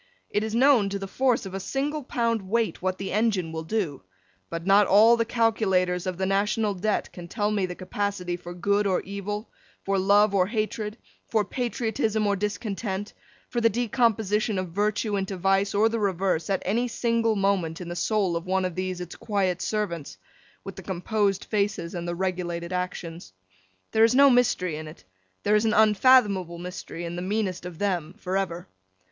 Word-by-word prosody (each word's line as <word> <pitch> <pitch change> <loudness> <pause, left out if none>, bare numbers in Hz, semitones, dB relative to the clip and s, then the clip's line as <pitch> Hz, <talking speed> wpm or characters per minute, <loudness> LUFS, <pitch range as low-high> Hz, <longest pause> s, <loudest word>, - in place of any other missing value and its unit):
It 210 - +1
is 220 0 -3
known, 245 -5 +5
to 200 - -2
the 195 0 -6
force 250 +2 +1
of 190 - -7
a 195 - -3
single 280 +9 -2
pound 230 -4 0
weight, 225 -5 0
what 185 0 -1
the 195 - -5
engine 205 -6 +1
will 160 0 -4
do; 165 -6 -2 0.5
but, 165 0 -5
not 200 +1 +5
all 220 +4 +7
the 230 0 0
calculators 190 -6 +1
of 185 -2 -3
the 190 - -1
National 205 +2 +1
Debt 205 +3 -1
can 175 -1 -9
tell 210 +3 -1
me 200 -3 0
the 180 - -6
capacity 185 -1 -3
for 175 0 -9
good 200 +3 +1
or 185 - +1
evil, 205 +2 -5 0.3
for 195 0 +1
love 200 +2 +4
or 185 -2 +3
hatred, 215 0 -3 0.3
for 215 -2 +1
patriotism 225 -2 -1
or 200 -1 +2
discontent, 205 0 -3 0.3
for 240 - -2
the 230 - +5
decomposition 220 -3 +1
of 185 -1 -2
virtue 205 +3 0
into 195 0 -3
vice, 195 +2 +1
or 215 +2 +4
the 225 0 -1
reverse, 190 -4 0
at 195 - 0
any 235 +6 +1
single 230 -1 +1
moment 195 -5 0
in 180 - -7
the 175 - -5
soul 195 -2 +1
of 170 +2 -4
one 190 0 +1
of 180 - -2
these 185 0 -3
its 175 -1 -7
quiet 190 -4 -1
servants, 185 -8 -3 0.5
with - - -8
the - - -8
composed 195 +2 -1
faces 205 -4 -1
and 175 -1 -4
the 175 - -2
regulated 175 -1 -3
actions. 175 - -5 0.6
There 220 - +4
is 230 +2 +4
no 280 0 +7
mystery 185 -10 +2
in 155 0 -7
it; 155 -11 -12 0.4
there 210 - +2
is 210 +1 +3
an 220 - +2
unfathomable 210 -5 +4
mystery 175 -1 -7
in 170 +1 -5
the 175 - -4
meanest 185 -2 -2
of 175 -3 -9
them, 180 -4 -2
for 185 0 -4
ever. 180 -3 -2
200 Hz, 190 wpm, -26 LUFS, 180-220 Hz, 0.6 s, all